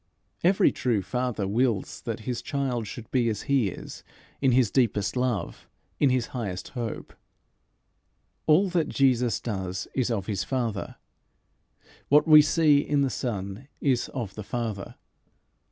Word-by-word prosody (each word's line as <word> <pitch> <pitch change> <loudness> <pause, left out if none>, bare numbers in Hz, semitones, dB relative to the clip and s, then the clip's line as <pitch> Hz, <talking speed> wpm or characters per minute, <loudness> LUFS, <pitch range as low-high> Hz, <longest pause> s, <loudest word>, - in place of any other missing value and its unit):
Every 185 +3 +4
true 115 -6 0
father 120 0 -2
wills 115 -1 0
that 115 -1 -3
his 120 +2 -3
child 135 -6 -2
should 115 +1 -9
be 120 -3 +2
as 105 -2 -3
he 135 -6 +2
is - - -9 0.4
in 135 -2 +4
his 125 -4 +3
deepest 115 -6 +1
love, 125 -4 -2 0.3
in 140 - +4
his 125 -2 0
highest 100 -8 -4
hope. 120 -4 -5 1.3
All 165 +6 +5
that 170 -4 0
Jesus 125 -4 +2
does 95 -4 -4
is 130 -2 0
of 105 -5 -1
his 100 -3 -2
Father. 115 -4 -3 1.1
What 150 +3 +5
we 155 -1 +9
see 150 -1 +4
in 145 0 +1
the 135 -2 +1
Son 100 +1 -4
is 130 -4 +1
of 115 -7 -5
the 105 - -7
Father. 110 -3 -4
120 Hz, 145 wpm, -26 LUFS, 105-135 Hz, 1.3 s, we